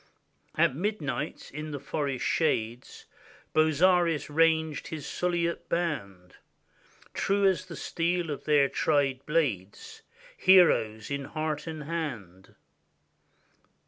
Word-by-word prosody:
At - - +3
midnight, 165 -4 -3
in 150 +2 -5
the 145 -2 -5
forest 140 -2 -3
shades, 120 -6 -1 0.5
Bozzaris 160 0 +3
ranged 160 -1 +2
his 155 -3 -6
Suliote 170 -1 -2
band, 100 - -3 0.8
True 200 0 +1
as 190 -2 +2
the - - -8
steel 170 -1 -1
of 145 - -6
their 145 -2 +4
tried 135 -2 0
blades, 150 - -2 0.3
Heroes 150 - +4
in 140 -1 -3
heart 155 +1 -3
and 155 -2 -5
hand. 120 - -6
155 Hz, 105 wpm, -28 LUFS, 135-170 Hz, 0.8 s, their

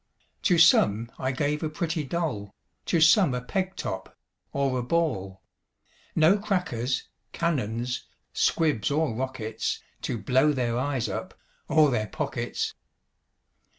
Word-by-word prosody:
To 180 - +3
some 115 -8 +5
I 130 - 0
gave 145 +3 -1
a 155 - -1
pretty 160 +1 -2
doll, 135 - -3 0.3
To 170 - +2
some 160 - +5
a 125 - -2
peg 190 +6 -2
top, - - -5 0.3
or 135 -2 0
a - - 0
ball; 110 - -1 0.7
No 170 +6 +5
crackers, 180 - -1 0.3
cannons, 125 -7 -1 0.3
squibs, 155 -10 +2
or 150 -3 +1
rockets, 115 -3 -3 0.2
To 120 - -2
blow 130 +8 +3
their 120 -3 0
eyes 130 -2 -1
up, - - -5 0.3
or 150 -1 +5
their 110 -3 0
pockets. - - -3
135 Hz, 125 wpm, -27 LUFS, 120-160 Hz, 0.7 s, some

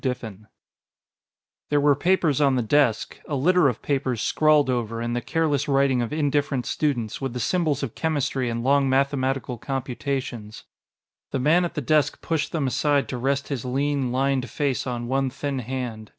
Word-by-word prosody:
Diffin_ 110 -6 -4 1.2
There 145 - +3
were 145 0 +4
papers 160 -1 +1
on 140 -2 +4
the 125 - +1
desk, 115 -1 +1
a 145 - -2
litter 165 +2 +4
of 125 - -5
papers 130 -4 -1
scrawled 155 +1 +3
over, 115 -3 -2
in 120 0 -2
the 120 - -1
careless 155 -1 0
writing 135 -2 +2
of 120 - -3
indifferent 145 -4 0
students, 125 -7 -1
with 135 -3 -3
the 125 - -4
symbols 150 +1 0
of 125 - -4
chemistry 140 -5 -1
and 115 0 -3
long 140 +1 +3
mathematical 135 -2 0
computations. 130 -4 -4 0.7
The - - -2
man 160 +7 +3
at 175 - -5
the 150 - -1
desk 145 +1 +1
pushed 160 -3 -2
them 155 -4 -1
aside 145 +2 +1
to 125 - -3
rest 140 +2 -1
his 135 -6 -3
lean, 135 0 -1
lined 135 0 0
face 140 -3 -1
on 120 -1 -3
one 135 +1 0
thin 140 +1 -3
hand. 120 -3 -5
135 Hz, 175 wpm, -24 LUFS, 125-145 Hz, 1.2 s, were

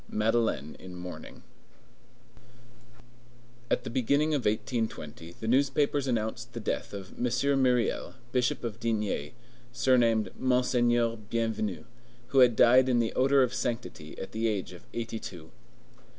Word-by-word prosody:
MADELEINE 110 - 0
IN 90 -1 -10
MOURNING 90 0 -9 2.3
At 125 - +1
the - - -5
beginning 140 +5 +2
of 140 -5 -1
1820 105 - -2
the 110 - -5
newspapers 140 +2 +2
announced 115 0 -2
the 120 - -5
death 105 - -3
of 95 -2 -8
M. 125 - 0 0.4
Myriel, 125 -2 +1 0.2
Bishop 125 -1 0
of 115 -2 -4
D——, 105 -10 -1 0.4
surnamed 120 -3 +3
"Monseigneur 120 -2 +2
Bienvenu," 110 -3 -2 0.5
who 135 - +3
had 125 -3 +6
died 125 +3 +6
in 125 - +3
the 115 -1 +1
odor 135 +1 +4
of 125 0 -1
sanctity 115 -13 -4
at - - -7
the 110 +1 -1
age 100 -4 -2
of 90 - -14
eighty 115 -1 -4
two. 80 -6 -9
115 Hz, 135 wpm, -29 LUFS, 105-125 Hz, 2.3 s, had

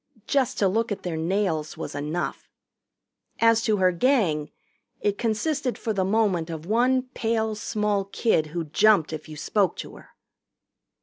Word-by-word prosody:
Just 270 -4 +1
to 200 - +3
look 225 +4 0
at 200 -1 -4
their 175 -3 -3
nails 165 -2 -1
was - - -5
enough. 150 +4 -4 0.9
As 230 0 +4
to 215 -1 +2
her 185 -1 +4
Gang, 175 - +1 0.5
it 205 -1 -1
consisted 250 +4 -1
for 220 - -2
the 195 -2 0
moment 190 -4 +1
of 160 -1 -6
one 250 +5 +2
pale 220 -1 0
small 210 -1 -1
kid 200 -5 +1
who 165 +2 -3
jumped 170 +1 +3
if 155 0 -7
you 155 - -8
spoke 195 +3 +1
to - - -8
her. - - -16
205 Hz, 160 wpm, -25 LUFS, 165-225 Hz, 0.9 s, As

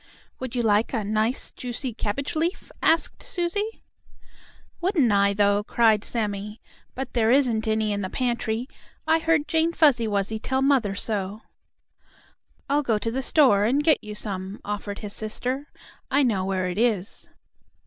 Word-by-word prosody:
"Would 255 -1 -5
you 240 - 0
like 215 +2 +2
a 225 -4 0
nice, 215 +5 0
juicy 245 0 -5
cabbage 230 +8 -3
leaf?" 335 +4 -2
asked 325 +1 +2
Susie. 405 +5 -2 1.0
"Wouldn't 340 - +2
I, 200 0 +3
though!" 205 0 +3
cried 220 -1 +3
Sammie, 210 -1 -2 0.4
"But 265 0 -5
there 225 -2 +2
isn't 240 -4 +2
any 220 -1 +1
in 205 - -2
the 185 - -3
pantry. 240 -1 -1 0.4
I 320 +1 +3
heard 325 -2 +1
Jane 325 +2 +1
Fuzzy 275 -9 +4
Wuzzy 205 +1 -1
tell 265 +4 0
mother 255 -8 +2
so." 205 0 -3 1.2
"I'll 285 +2 +2
go 230 -6 +1
to 225 +2 -2
the 265 +3 -2
store 255 -8 +4
and 275 +6 +2
get 315 -2 +3
you 210 0 -7
some," 195 -1 -5
offered 205 0 -4
his 200 - -4
sister. 250 +6 -3 0.4
"I 280 +2 +3
know 205 -7 +1
where 190 -1 -1
it 180 +3 -3
is." 220 -5 0
225 Hz, 160 wpm, -25 LUFS, 205-275 Hz, 1.2 s, Fuzzy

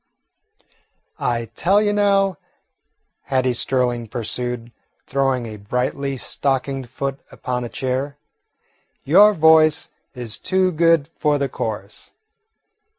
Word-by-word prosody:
"I 115 -2 -2
tell 195 +4 +3
you, 210 -1 +1
now," 195 -3 +2 0.9
Hattie 130 -2 +1
Sterling 120 -1 0
pursued, 120 +1 -4 0.3
throwing 135 -2 0
a 110 -2 -7
brightly 125 +6 -2
stockinged 135 -1 -2
foot 135 +2 -4
upon 125 -1 -4
a 120 - -5
chair, 135 +3 -3 0.9
"your 200 +8 +6
voice 160 -1 +5 0.3
is 120 -3 -5
too 185 -1 +1
good 165 -2 +3
for 150 -1 +2
the 140 -1 0
chorus. 105 -5 -6
135 Hz, 105 wpm, -21 LUFS, 125-160 Hz, 0.9 s, your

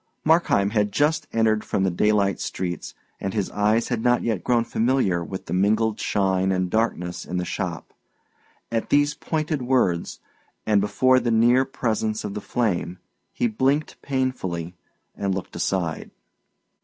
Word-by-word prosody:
Markheim 155 -11 +3
had 105 -2 +2
but 100 - -15
just 150 +1 +1
entered 110 -1 +2
from 95 - -1
the 95 - +2
daylight 100 +1 +2
streets, 90 -2 -4 0.2
and 95 +1 -4
his 100 -3 -1
eyes 105 +3 +1
had 120 -3 -1
not 120 +1 +2
yet 110 -6 -1
grown 120 -2 +2
familiar 115 -8 +1
with 95 +2 -7
the - - -5
mingled 105 +3 +2
shine 95 -1 +1
and 90 -1 -1
darkness 90 -6 -1
in 90 - -4
the 90 - -1
shop. - - -4 0.8
At 115 -1 -1
these 145 +1 +3
pointed 155 -1 -2
words, 120 -10 0 0.5
and 105 -2 +3
before 130 +6 +3
the 120 -1 -1
near 120 +3 +4
presence 110 -4 -2
of 105 - -4
the 105 - -5
flame, 95 -7 -1 0.3
he - - -1
blinked 135 +7 0
painfully 110 -11 -2 0.4
and 100 -2 -1
looked 95 - -6
aside. 85 -4 -2
110 Hz, 155 wpm, -24 LUFS, 95-125 Hz, 0.8 s, near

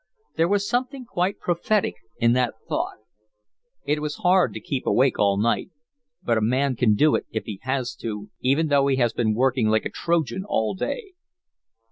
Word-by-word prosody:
There 165 +1 +3
was 200 +1 +1
something 255 +1 -2
quite 190 -4 -1
prophetic 180 - 0 0.2
in 115 0 +3
that 125 -2 +1
thought. - - -2 0.9
It 150 +1 +1
is 150 -1 -3
hard 180 0 +3
to - - -4
keep 135 -3 -4
awake 130 0 +3
all 100 -1 +3
night, 115 - 0 0.5
but 115 -2 +2
a - - -4
man 130 +4 +1
can 110 -3 +3
do 150 +8 +4
it - - -1
if 110 - -4
he 100 -3 -6
has 130 -1 -2
to 105 -2 -6
even 145 +5 +1
though 140 -1 +3
he 135 - +2
has 120 -3 +1
been 110 -2 0
working 130 -1 +2
like 110 0 +2
a - - -3
Trojan 165 -1 -1
all 110 - 0
day. 400 - -4
135 Hz, 185 wpm, -24 LUFS, 115-170 Hz, 0.9 s, do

